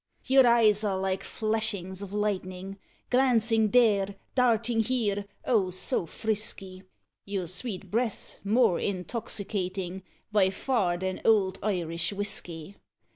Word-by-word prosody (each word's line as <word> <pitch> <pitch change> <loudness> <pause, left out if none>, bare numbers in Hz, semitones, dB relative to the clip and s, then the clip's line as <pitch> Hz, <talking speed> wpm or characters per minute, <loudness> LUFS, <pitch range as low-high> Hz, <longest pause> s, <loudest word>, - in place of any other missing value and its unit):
Your 265 -1 +6
eyes 220 -3 +4
are 200 -3 0
like 190 0 -1
flashings 215 -4 -2
of 200 -1 -7
lightning, 195 -2 -3 0.3
Glancing 230 -4 +3
there, 200 -4 +3 0.2
darting 235 -2 +2
here, 215 -4 0 0.2
oh! 210 -7 +2
so 180 -1 -2
frisky; 195 -2 -4 0.4
Your 195 -2 -3
sweet 185 +1 -4
breath's 230 0 -2
more 215 -3 +3
intoxicating 190 -2 -3 0.3
By 200 -3 +4
far 190 -3 0
than 185 +1 -3
old 200 -4 +3
Irish 175 -3 -1
whisky! 195 -3 -4
200 Hz, 115 wpm, -28 LUFS, 190-225 Hz, 0.4 s, Your